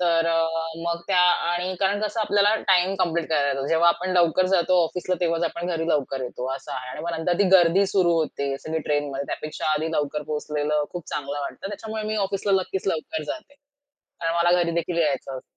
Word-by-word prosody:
तर 165 -2 +2
अ, 165 0 +2 0.4
मग 170 0 -2
त्या 185 -2 +3
आणि 180 +1 +2
कारण 200 +1 +1
कसं 215 +1 -1
आपल्याला 205 0 +3
टाईम 185 +1 +4
कंप्लीट 170 -2 0
करायला 145 -3 +2
येतो. 135 0 -1
जेव्हा 165 +1 +4
आपण 180 +2 0
लवकर 175 +1 +4
जातो 180 0 +3
ऑफिसला 180 +2 -2
तेव्हाच 170 -1 +1
आपण 170 +1 -3
घरी 165 -1 -2
लवकर 135 -4 0
येतो 125 +1 -5
असं 135 - -8
आहे 125 0 -5
आणि - - -7
मग 170 - -2
नंतर 175 +1 0
ती 205 - +4
गर्दी 175 +3 +4
सुरू 185 -3 +2
होते 140 -3 -2
सगळी 160 +2 -3
ट्रेनमध्ये. 145 -1 -1
त्यापेक्षा 155 - -5
आधी 155 +1 -1
लवकर 150 0 -1
पोहोचलेलं 150 0 -1
खूप 175 -2 -6
चांगलं 145 0 -4
वाटतं, 170 +6 -6
त्याच्यामुळे 220 +1 -5
मी 215 0 -2
ऑफिसला 195 +1 -1
नक्कीच 190 +1 -4
लवकर 160 -2 -2
जाते. 285 - -7 0.7
कारण 165 0 -1
मला 170 0 +3
घरीदेखील 170 0 -1
यायचं 135 -3 -1
असतं. - - -10
170 Hz, 195 wpm, -24 LUFS, 150-185 Hz, 0.7 s, टाईम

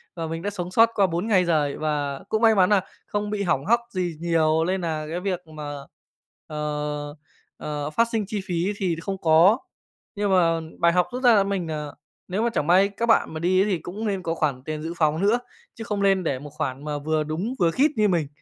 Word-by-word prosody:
Và 165 -1 -4
mình 165 +1 -4
đã 205 - -2
sống 180 -3 -5
sót 230 +3 +5
qua 200 -2 +4
4 175 +5 -2
ngày 185 -5 +3
giời 150 -4 +1
và 145 -3 -2
cũng 220 - 0
may 225 -2 +5
mắn 185 -2 +4
nà 205 -3 +4 0.3
không 205 0 -2
bị 205 -1 -2
hỏng 140 -5 0
hóc 235 +3 +4
gì 180 -5 -2
nhiều 160 -1 +2
lên 185 +2 -1
nà 155 -2 -2
cái 170 - -3
việc 180 -2 -3
mà, 150 -2 -7 0.7
ờ, 150 -1 -4 0.4
ờ, 150 -1 -4
phát 230 +9 +2
sinh 220 -3 0
chi 210 -1 -3
phí 180 +3 -1
thì 180 -4 0
không 195 +2 -4
có. 170 +6 +5 0.6
Nhưng 205 -1 0
mà 165 -3 +3 0.2
bài 170 0 +4
học 180 -1 +2
rút 255 +1 -4
ra 240 -2 +7
là 200 - +4
mình, 195 -4 -2
à, 150 -1 -3 0.4
nếu 190 +4 -2
mà 235 - +2
chẳng 150 - -1
may 190 +3 +5
các 230 +4 -3
bạn 225 -7 +3
mà 160 - -4
đi 185 +3 +3
ấy - - -1
thì 180 - +1
cũng 205 +7 -6
nên 195 -3 -2
có 165 - -1
khoản 140 -6 -1
tiền 155 +1 -5
dự 165 +1 -4
phòng 155 +1 +1
nữa, 220 +5 +3 0.4
chứ 225 - -7
không 210 -2 -3
lên 195 -2 +3
để 135 -5 -1
một 145 +1 -9
khoản 145 -3 -4
mà 150 -1 -2
vừa 155 +1 0
đúng, 175 - -3
vừa 170 -2 +3
khít 290 - +3
như 215 -1 +4
mình. 170 -7 +1
175 Hz, 240 wpm, -24 LUFS, 155-200 Hz, 0.7 s, ra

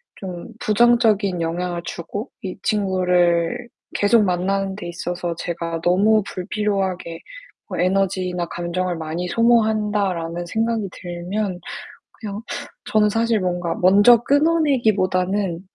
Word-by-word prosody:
좀 180 -3 -7
부정적인 215 -4 +3
영향을 175 +1 -2
주고 200 - -6
이 185 -2 -6
친구를 180 0 +1 0.3
계속 210 +2 +4
만나는 195 +1 0
데 190 -3 -7
있어서 175 0 -4
제가 170 -1 -4
'너무 205 +4 +4
불필요하게 190 -4 -2 0.5
뭐 - - -4
에너지나 185 -1 0
감정을 175 +1 -3
많이 160 +3 -4
소모한다.'라는 210 -6 +1
생각이 225 +2 -1
들면 180 +2 -4 0.6
그냥 210 -1 -5 0.5
저는 215 -1 +4
사실 225 0 +1
뭔가 175 -2 -1
먼저 205 +6 +6
끊어 315 +4 +3
내기보다는 195 - +1
190 Hz, 265 characters per minute, -21 LUFS, 175-215 Hz, 0.6 s, 먼저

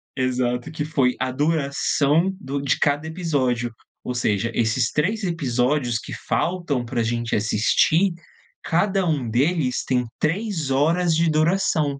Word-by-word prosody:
exato, 125 -1 -1
que 150 -1 -3
foi 135 -5 +1
a 130 0 -1
duração 150 +3 +1
do 140 -6 -4
de 140 - +1
cada 145 +1 +1
episódio, 135 -8 -1 0.3
ou 125 - -4
seja, 115 -1 0
esses 115 +1 +1
3 200 +8 0
episódios 130 -6 0
que - - -8
faltam 170 -8 0
pra 120 -1 -1
gente 115 +1 -1
assistir, 115 - +2 0.5
cada 190 +3 +1
um 140 -7 -1
deles 135 +2 +1
tem 125 -1 +1
3 165 -3 -1
horas 165 +5 +2
de 165 0 +2
duração. 155 0 +2
145 Hz, 135 wpm, -22 LUFS, 125-165 Hz, 0.5 s, assistir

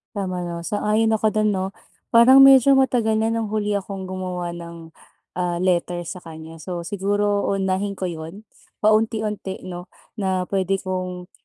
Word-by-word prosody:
Tama 185 -3 -3
'no, 170 -1 -5
sang-ayon 215 +4 +1
ako 215 0 +1
do'n, 215 0 +1
'no? 190 0 -1 0.5
Parang 260 +4 +8
medyo 270 0 +7
matagal 245 -4 +2
na 220 +1 +1
nang 225 -1 -1
huli 210 0 -2
akong 195 -1 -3
gumawa 185 -2 -4
ng, 170 -1 -10 0.5
ah, 175 -1 0
letter 175 -1 0
sa 175 +2 -7
kanya. 160 -1 -11
So, 175 0 -5
siguro 205 +1 0
uunahin 195 0 -1
ko - - -7
'yon, 165 +6 -9 0.4
paunti-unti, 215 -2 0
'no, 180 -1 -8 0.3
na 190 -2 0
puwede 195 -1 +1
kong 185 -1 -5
190 Hz, 150 wpm, -22 LUFS, 180-215 Hz, 0.5 s, Parang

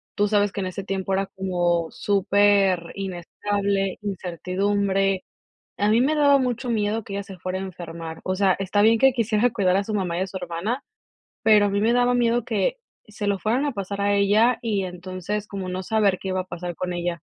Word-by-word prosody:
tú 205 0 +2
sabes 205 -1 +2
que 200 - -5
en 185 - -2
ese 190 +1 -5
tiempo 195 0 -2
era 195 0 0
como 175 -3 0
superinestable, 195 0 +1
incertidumbre. 195 +1 -1 0.5
A 205 +1 +2
mí 230 +3 +4
me 295 +4 +2
daba 285 -2 +5
mucho 250 -1 -2
miedo 215 0 0
que 195 - -8
ella 200 0 -3
se 190 -1 -11
fuera 185 +2 -3
a - - -5
enfermar. 165 -3 -7
O 185 - -1
sea, 190 -1 +3
está 195 +2 +1
bien 225 +1 +5
que 270 0 +6
quisiera 230 0 +2
cuidar 185 -5 +2
a 200 - +1
su 215 - -5
mamá 180 -4 -1
y - - -1
a 190 - -1
su 190 - -6
hermana, 180 +9 -3 0.6
pero 210 -2 +6
a - - 0
mí 200 +1 0
me 230 +2 +3
daba 245 0 +3
miedo 240 -1 +2
que 250 - 0 0.3
se 210 0 -6
lo 200 -1 +1
fueran 245 +8 0
a 285 - 0
pasar 200 0 -4
a 205 0 +2
ella, 215 +5 +4
y 205 -4 0
entonces, 185 +3 -5
como 195 -2 -5
no 185 +1 -3
saber 205 -2 +2
qué 190 - -5
iba 185 - -1
a - - -7
pasar 175 -1 -6
con 180 +1 -3
ella. 175 -2 -3
200 Hz, 210 wpm, -24 LUFS, 185-215 Hz, 0.6 s, que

